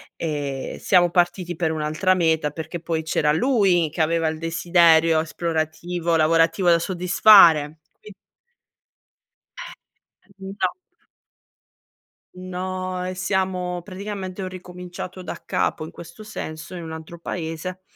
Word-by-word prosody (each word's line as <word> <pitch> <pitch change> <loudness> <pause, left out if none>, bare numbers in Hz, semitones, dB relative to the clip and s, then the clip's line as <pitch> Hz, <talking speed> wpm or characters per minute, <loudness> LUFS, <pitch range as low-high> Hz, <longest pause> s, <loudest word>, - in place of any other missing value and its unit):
e 145 -4 -4
siamo 175 -2 +4
partiti 175 0 0
per 160 -2 0
un'altra 155 +4 +1
meta, 160 -4 +1
perché 160 +3 -6
poi 165 -1 -3
c'era 150 -1 +1
lui 185 - +2
che 160 - -3
aveva 165 +1 +1
il 160 0 -2
desiderio 165 -1 +3
esplorativo, 165 +1 -2
lavorativo 165 +3 +3
da 170 - +6
soddisfare. 175 -4 +5 0.2
Qui 210 - -12 2.3
No. 190 -1 -2 1.6
No 185 0 -4
e 185 - -3
siamo 185 -1 -2
praticamente 195 0 -6
ho 190 - -3
ricominciato 180 0 -8
da 180 - -7
capo - - -1
in 160 - -8
questo 170 +6 -12
senso, 180 -5 -7
in 175 - -7
un 160 -1 -7
altro 160 +2 -9
paese, 170 +2 -5
175 Hz, 115 wpm, -22 LUFS, 160-185 Hz, 2.3 s, da